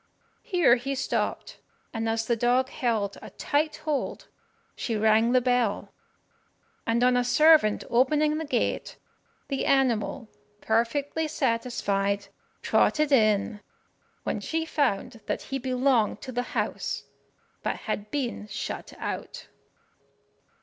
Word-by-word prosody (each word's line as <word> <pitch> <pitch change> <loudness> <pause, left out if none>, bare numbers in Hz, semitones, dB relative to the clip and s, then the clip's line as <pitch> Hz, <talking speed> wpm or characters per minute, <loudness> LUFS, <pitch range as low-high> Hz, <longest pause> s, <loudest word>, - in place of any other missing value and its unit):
Here 345 -10 +4
he 275 +3 -3
stopped, - - -2 0.3
and 225 -1 -1
as 225 0 0
the 235 - +1
dog 245 +3 +2
held 220 -5 -1
a - - -9
tight 300 +1 -1
hold, 300 -3 -2 0.5
she 230 - -2
rang 220 +2 +3
the 255 0 +4
bell; 245 -4 0 0.9
and 230 +1 +2
on 250 0 +4
a 245 - +3
servant 300 -4 +5
opening 300 +5 +2
the 320 - -3
gate 290 - -1 0.5
the 275 -2 -2
animal, 255 -2 +1 0.3
perfectly 275 +9 0
satisfied, 200 -6 -1 0.3
trotted 305 -1 +2
in, 215 -4 +3 0.6
when - - -2
she 325 0 -2
found 250 -6 -1
that - - -2
he 270 - -4
belonged 255 -3 +1
to 260 - -7
the 245 0 -1 0.2
house, - - -2 0.6
but - - -1
had 210 +1 -3
been 245 -6 -3
shut 210 +2 -5
out. - - -6
245 Hz, 120 wpm, -27 LUFS, 225-275 Hz, 0.9 s, servant